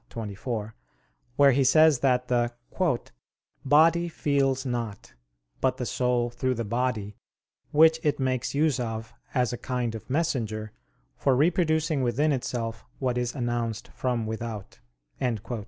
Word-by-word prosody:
xii, -, -, -22 dB
24) 110 Hz, 0 st, -4 dB, 0.6 s
where 140 Hz, 0 st, +6 dB
he 135 Hz, +2 st, +3 dB
says 155 Hz, +1 st, +5 dB
that 125 Hz, -2 st, +2 dB
the 120 Hz, -1 st, +1 dB, 1.1 s
"body 165 Hz, +5 st, +4 dB
feels 135 Hz, -4 st, 0 dB
not, 115 Hz, -5 st, -4 dB, 0.5 s
but 130 Hz, -1 st, +1 dB
the 125 Hz, -, -3 dB
soul 120 Hz, 0 st, 0 dB
through 130 Hz, +1 st, -1 dB
the 115 Hz, -1 st, -3 dB
body, 110 Hz, -3 st, -2 dB, 0.5 s
which 160 Hz, +2 st, +5 dB
it 150 Hz, -2 st, 0 dB
makes 130 Hz, 0 st, -1 dB
use 150 Hz, -2 st, +2 dB
of 115 Hz, -2 st, -4 dB, 0.2 s
as 125 Hz, -2 st, +2 dB
a 120 Hz, -, -5 dB
kind 125 Hz, -3 st, -2 dB
of 110 Hz, -, -9 dB
messenger, 115 Hz, -8 st, -1 dB, 0.4 s
for 135 Hz, -2 st, +2 dB
reproducing 160 Hz, 0 st, +2 dB
within 130 Hz, +5 st, +1 dB
itself 115 Hz, -4 st, -3 dB
what 125 Hz, -2 st, -1 dB
is 125 Hz, +1 st, -2 dB
announced 120 Hz, -3 st, -2 dB
from 120 Hz, -3 st, -2 dB
without." 110 Hz, -2 st, -6 dB
125 Hz, 135 wpm, -27 LUFS, 115-140 Hz, 1.1 s, where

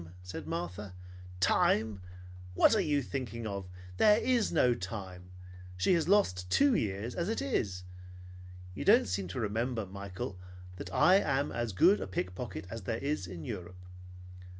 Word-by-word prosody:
said 90 Hz, 0 st, -7 dB
Martha. 90 Hz, +3 st, -5 dB, 0.4 s
"Time! 105 Hz, +2 st, +2 dB, 0.5 s
What -, -, +5 dB
are 210 Hz, -, +3 dB
you 145 Hz, -5 st, +1 dB
thinking 120 Hz, -3 st, -5 dB
of? 100 Hz, -3 st, -5 dB, 0.3 s
There 210 Hz, -, +6 dB
is 240 Hz, -2 st, +1 dB
no 125 Hz, -7 st, +4 dB
time! 95 Hz, -4 st, -7 dB, 0.5 s
She 95 Hz, -, +3 dB
has 165 Hz, -2 st, +1 dB
lost 90 Hz, -, +2 dB
two 280 Hz, -, +4 dB
years, 105 Hz, -, -1 dB
as 175 Hz, +3 st, -2 dB
it 225 Hz, -, -1 dB
is. 100 Hz, -, -2 dB, 0.9 s
You -, -, -5 dB
don't -, -, +5 dB
seem 95 Hz, 0 st, -2 dB
to 90 Hz, -, -5 dB
remember, 115 Hz, +1 st, -1 dB
Michael, 100 Hz, -1 st, -7 dB, 0.4 s
that 95 Hz, -, -7 dB
I 185 Hz, -, +5 dB
am 140 Hz, -6 st, 0 dB
as 120 Hz, -1 st, -2 dB
good 180 Hz, -, +4 dB
a -, -, -4 dB
pickpocket 95 Hz, +3 st, -4 dB
as 115 Hz, 0 st, -5 dB
there 110 Hz, +4 st, -2 dB
is 140 Hz, -8 st, -2 dB
in 85 Hz, -2 st, -8 dB
Europe. 90 Hz, -5 st, -6 dB
105 Hz, 155 wpm, -31 LUFS, 90-140 Hz, 0.9 s, There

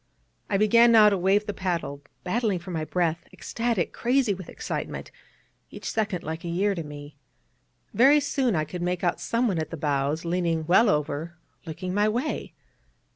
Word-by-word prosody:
I -, -, +2 dB
began 230 Hz, +3 st, +5 dB
now 215 Hz, -2 st, +7 dB
to 200 Hz, -, 0 dB
wave 195 Hz, +3 st, +2 dB
the 205 Hz, -, -3 dB
paddle, 170 Hz, -7 st, -3 dB, 0.2 s
battling 210 Hz, +1 st, 0 dB
for 175 Hz, +2 st, -8 dB
my 160 Hz, -2 st, -2 dB
breath, 170 Hz, -1 st, -1 dB
ecstatic, 230 Hz, -7 st, -2 dB
crazy 245 Hz, -3 st, +1 dB
with 185 Hz, -3 st, -9 dB
excitement, -, -, -5 dB, 0.6 s
each -, -, -8 dB
second 210 Hz, -5 st, -1 dB
like 160 Hz, +1 st, -5 dB
a -, -, -5 dB
year 195 Hz, +4 st, +1 dB
to 175 Hz, -, -4 dB
me. 145 Hz, -1 st, -10 dB, 0.8 s
Very 270 Hz, +7 st, +6 dB
soon 270 Hz, -6 st, 0 dB
I 155 Hz, -1 st, 0 dB
could 175 Hz, +4 st, -7 dB
make 180 Hz, +1 st, -2 dB
out 175 Hz, -, 0 dB
someone 230 Hz, -7 st, 0 dB
at 155 Hz, -, -3 dB
the 165 Hz, -, -6 dB
bows, 145 Hz, +2 st, -1 dB
leaning 170 Hz, -2 st, 0 dB
well 190 Hz, +7 st, +5 dB
over, 150 Hz, +2 st, -2 dB, 0.3 s
looking 180 Hz, +3 st, -5 dB
my 205 Hz, +2 st, +2 dB
way. 245 Hz, +7 st, -3 dB
180 Hz, 175 wpm, -26 LUFS, 160-215 Hz, 0.8 s, now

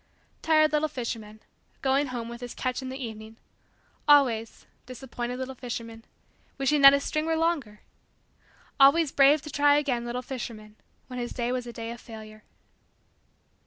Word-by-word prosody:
Tired 310 Hz, -1 st, +4 dB
little 305 Hz, 0 st, +1 dB
fisherman 225 Hz, -6 st, -6 dB, 0.4 s
going 275 Hz, +2 st, +2 dB
home 240 Hz, -3 st, -5 dB
with 235 Hz, +1 st, -9 dB
his 245 Hz, -1 st, -7 dB
catch 255 Hz, +1 st, -2 dB
in 260 Hz, -, -6 dB
the 260 Hz, -, -6 dB
evening! 220 Hz, -3 st, -8 dB, 0.7 s
Always 250 Hz, -7 st, +3 dB, 0.2 s
disappointed 250 Hz, -1 st, -6 dB
little 260 Hz, 0 st, -5 dB
fisherman 230 Hz, -2 st, -7 dB, 0.5 s
wishing 280 Hz, +2 st, +1 dB
that 275 Hz, 0 st, +10 dB
his 280 Hz, 0 st, +1 dB
string 310 Hz, +1 st, -2 dB
were 325 Hz, -, +1 dB
longer! 315 Hz, -11 st, -1 dB, 1.0 s
Always 280 Hz, +2 st, +6 dB
brave 280 Hz, +1 st, +5 dB
to 300 Hz, -, -8 dB
try 290 Hz, +1 st, +4 dB
again 265 Hz, -5 st, -1 dB
little 240 Hz, +1 st, -4 dB
fisherman 225 Hz, -5 st, -7 dB, 0.3 s
when 250 Hz, -1 st, -7 dB
his 240 Hz, 0 st, -4 dB
day 240 Hz, -1 st, -2 dB
was 250 Hz, -1 st, -3 dB
a -, -, -6 dB
day 230 Hz, 0 st, -6 dB
of 235 Hz, -, -9 dB
failure! 215 Hz, -1 st, -11 dB
255 Hz, 160 wpm, -27 LUFS, 230-280 Hz, 1.0 s, that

